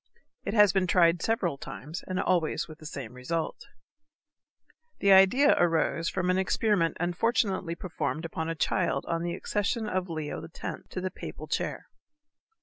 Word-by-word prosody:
It 200 - -2
has 210 -3 +6
been 190 -2 +2
tried 170 -1 +4
several 180 -10 0
times 155 +6 -7
and 185 -1 -2
always 170 -4 +1
with 155 -2 -12
the 155 - -8
same 130 -6 -7
result. 155 +6 -4 1.3
The 200 - +3
idea 195 +10 +7
arose 165 -1 +2
from 185 -1 0
an 185 - +2
experiment 190 -2 +1
unfortunately 185 0 0
performed 170 -2 -3
upon 160 0 -3
a 165 - -2
child 140 -3 0
on 165 0 -1
the 170 0 -2
accession 210 +2 -1
of 185 -2 -2
Leo 155 -2 -4
X. 165 - -6
to 185 - -4
the 185 0 -2
papal - - -8
chair. - - -3
175 Hz, 155 wpm, -28 LUFS, 165-195 Hz, 1.3 s, idea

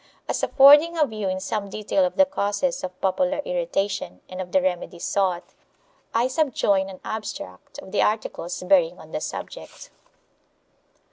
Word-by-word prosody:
As - - -1
affording 295 +5 +6
a 310 - +4
view 215 -6 -4
in 185 0 -2
some 200 +1 -3
detail 215 +8 0
of 270 - -3
the 285 - +6
causes 255 +1 -1
of 185 0 -6
popular 275 +9 +1
irri 175 -9 -3
tation 195 - -2
and 185 0 -5
of 180 -1 -7
the 190 - +4
remedies 180 -1 -3
sought, 185 -3 -1 0.6
I 235 +2 +2
subjoin 240 -9 +1
an 185 - -10
abstract 210 - -7
of 190 - -10
the - - +1
articles 210 -5 -2
bearing 180 -2 +3
on 160 - -14
the - - -3
subject. - - -8
200 Hz, 160 wpm, -24 LUFS, 185-260 Hz, 0.6 s, affording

